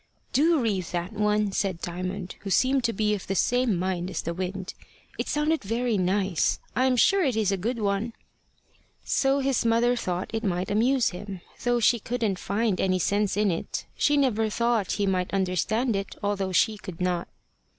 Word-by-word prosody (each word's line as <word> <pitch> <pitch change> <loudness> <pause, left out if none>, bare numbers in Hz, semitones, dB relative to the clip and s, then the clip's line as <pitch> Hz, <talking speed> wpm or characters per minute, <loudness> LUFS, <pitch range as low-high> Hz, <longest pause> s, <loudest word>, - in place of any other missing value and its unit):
"Do 320 +3 +4
read 205 -7 0
that 175 +3 -4
one," 210 -1 +1
said 190 -3 -1
Diamond, 180 +2 -4
who 200 - -7
seemed 260 +6 +3
to 230 - +2
be 210 0 0
of 200 - -4
the 195 - -1
same 245 0 +2
mind 180 0 -2
as - - -4
the 170 - -2
wind. 185 +1 -4 0.5
"It - - -1
sounded 300 0 0
very 230 +3 0
nice. 190 -1 +1 0.2
I 255 - +3
am 260 -1 +3
sure 390 - +4
it 260 -7 +1
is 215 -3 +1
a - - +2
good 225 +7 -2
one." 210 +2 -1 0.9
So 275 0 +2
his 270 -2 +1
mother 235 +2 +3
thought 180 -6 -3
it 225 0 -2
might 185 -2 -1
amuse 240 +4 +3
him, 190 0 -7 0.2
though 245 0 +2
she 235 +1 +4
couldn't 220 -4 -2
find 205 0 0
any 185 -1 +2
sense 200 +3 0
in 210 -2 +3
it. 165 - -4
She 290 0 +2
never 225 -6 +2
thought 235 -2 0
he 205 - 0
might 185 -2 0
understand 200 +5 0
it, 195 0 -4
although 200 -2 -1
she 215 +3 +2
could 185 -5 -9
not. 180 -1 -1
205 Hz, 190 wpm, -26 LUFS, 185-235 Hz, 0.9 s, Do